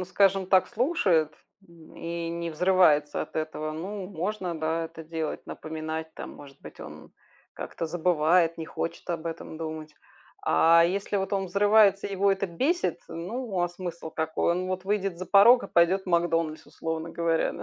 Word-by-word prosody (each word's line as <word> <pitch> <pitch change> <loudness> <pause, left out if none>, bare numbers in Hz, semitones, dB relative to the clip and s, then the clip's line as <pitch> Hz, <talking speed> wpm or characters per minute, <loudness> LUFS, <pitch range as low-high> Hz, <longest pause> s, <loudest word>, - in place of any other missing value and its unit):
ну - - -2
скажем 195 0 +2
так, 185 0 +4
слушает, 205 - +1 0.6
и 170 0 -4
не 170 0 -4
взрывается 160 -3 +3
от - - -11
этого, 155 0 -3
ну 190 +5 -5
можно, 185 0 -3
да, 160 +1 -1
это 165 0 -9
делать. 160 -1 -4
Напоминать 160 0 -5
там, - - -7
может 140 -2 -14
быть, - - -12
он - - -11 0.4
как-то 165 - -5
забывает, 165 0 +2
не 160 - -5
хочет 165 - -5
об 170 -1 -3
этом 165 -1 -6
думать. 155 -1 -6 0.5
А 165 +1 +5
если 200 +4 -1
вот 195 0 -2
он 195 -1 0
взрывается, 200 +1 +4
его 200 0 +2
это 195 0 -2
бесит, 275 - 0
ну, 195 +4 -4
а 175 - +1
смысл 175 -2 -7
какой? 160 +1 -1
Он 180 +1 -2
вот 185 0 -3
выйдет 195 -2 -1
за 185 - -6
порог 220 +7 +7
и - - -8
пойдет 175 +3 +3
в - - -25
"Макдональдс", 165 -3 0
условно 160 0 -5
говоря, 165 -1 0
да. - - -8
170 Hz, 170 wpm, -27 LUFS, 160-195 Hz, 0.6 s, порог